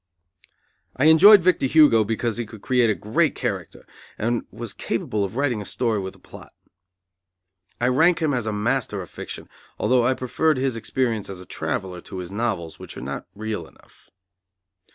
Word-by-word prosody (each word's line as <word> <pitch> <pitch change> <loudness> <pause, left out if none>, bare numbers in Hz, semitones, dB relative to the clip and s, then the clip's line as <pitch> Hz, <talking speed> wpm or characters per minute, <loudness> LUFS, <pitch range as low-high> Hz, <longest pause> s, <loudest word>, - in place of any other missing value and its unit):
I 135 - +2
enjoyed 180 +5 +8
Victor 180 -6 +3
Hugo 135 -7 +6
because 115 +1 -2
he 120 -2 -3
could 110 -1 -13
create 125 -3 +3
a 110 - +2
great 145 +10 0
character, 100 -9 -4 0.3
and 120 +2 -1
was 120 -2 -7
capable 105 -1 -2
of 100 +2 -4
writing 130 -5 0
a - - -5
story 115 +1 -1
with 95 -1 -6
a - - -18
plot. - - -14 1.3
I 120 - +1
rank 160 +8 +4
him 155 -4 +1
as 120 -4 -1
a - - 0
master 105 -1 -1
of 90 - -14
fiction, - - -8 0.3
although 125 -1 +2
I 130 +2 +2
preferred 150 +4 0
his 130 -2 0
experience 115 -2 -2
as 95 -2 -7
a 90 - -10
traveller, 90 -1 -4
to 95 - -9
his 90 0 -6
novels, 100 -7 -3
which - - -10
are - - -6
not - - -6
real 105 -6 -4
enough. - - -23
115 Hz, 180 wpm, -23 LUFS, 105-130 Hz, 1.3 s, enjoyed